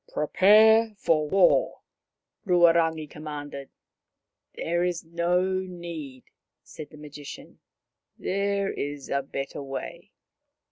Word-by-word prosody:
" - - -23
Prepare 215 +7 +5
for 155 -5 +1
war," 190 +1 +3 0.7
Ruarangi 165 -3 +3
commanded. 145 -2 -8 0.4
" - - -45
There 170 +1 -1
is 180 -1 -2
no 170 +2 0 0.2
need," 170 -8 -8 0.4
said 155 - -10
the 150 - -14
Magician. 150 -1 -11 0.3
" - - -58
There 200 +1 -1
is 145 -1 -5
a 140 - 0
better 135 +1 -6
way." 135 -1 -7
165 Hz, 110 wpm, -26 LUFS, 145-180 Hz, 0.7 s, Prepare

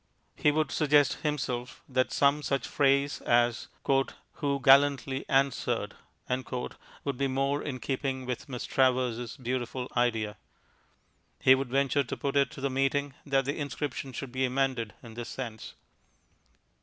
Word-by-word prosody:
He 150 - +3
would 155 +1 0
suggest 145 -3 +3
himself 125 -5 -3
that 130 -1 +1
some 140 +1 +3
such 140 -2 -1
phrase 140 0 +2
as 120 0 +2 0.2
"who 140 +1 -1
gallantly 135 0 +4
answered" 135 -1 +1 0.3
would 130 +1 -4
be 140 - +2
more 135 +2 0
in 130 -3 -4
keeping 130 0 -2
with 125 +2 -4
Miss 125 -2 -4
Travers' 125 -3 +1
beautiful 125 0 -3
idea. 110 -3 +1 1.0
He 130 - +7
would 130 -1 0
venture 140 +1 +2
to 120 - -5
put 140 -1 -2
it 140 -1 +4
to 150 -4 -10
the 140 0 0
meeting 135 +1 0
that 135 -1 +2
the 145 +4 -2
inscription 140 -1 -4
should 130 +1 -6
be 130 +1 -1
amended 130 -4 0
in 115 -2 -10
this 120 +1 -6
sense. 115 -5 -6
135 Hz, 145 wpm, -29 LUFS, 125-140 Hz, 1.0 s, He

